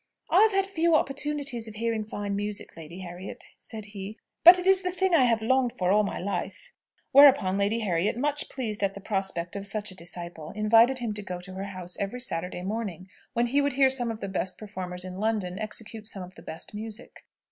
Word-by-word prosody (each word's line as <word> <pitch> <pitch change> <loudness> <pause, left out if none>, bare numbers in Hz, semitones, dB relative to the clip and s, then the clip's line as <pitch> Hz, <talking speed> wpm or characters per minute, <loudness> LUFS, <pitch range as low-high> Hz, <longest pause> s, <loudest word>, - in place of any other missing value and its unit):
"I 370 - +6
have 440 0 +6
had 390 -1 +2
few 340 -4 +2
opportunities 280 -4 0
of 215 - -9
hearing 225 -1 -1
fine 205 -1 -4
music, 205 0 -3
Lady 165 +3 -9
Harriet," 180 +1 -8
said 220 -2 -8
he; 205 +1 -8 0.3
"but 350 +2 +11
it 360 - -2
is 385 0 +6
the 365 - -1
thing 370 0 0
I 285 -6 +6
have 230 -2 +2
longed 255 +1 +2
for 180 0 +1
all 210 +1 +5
my 200 - -3
life." 195 - -4 0.4
Whereupon 270 -9 +7
Lady 200 +3 +1
Harriet, 190 +1 0
much 295 +3 0
pleased 225 -6 -4
at 195 -1 0
the - - -7
prospect 190 -4 -3
of 200 0 -4
such 205 0 -2
a - - -11
disciple, 170 -2 -6
invited 225 +4 +5
him 235 -4 -3
to 210 - -4
go 185 -3 -6
to 185 +1 -9
her 190 +1 -5
house 185 -2 -7
every 200 +5 -3
Saturday 180 -5 -2
morning, 195 -3 -4 0.2
when 235 0 +2
he 275 +4 +2
would 285 -1 0
hear 265 0 +4
some 245 -3 +2
of 225 -1 -5
the 200 - -3
best 185 -1 -2
performers 185 -4 -6
in 185 0 -7
London 210 -4 -1
execute 215 0 -5
some 195 -3 -4
of 180 +1 -11
the - - -13
best 160 - -7
music. 220 +2 -8
210 Hz, 220 wpm, -27 LUFS, 190-250 Hz, 0.4 s, but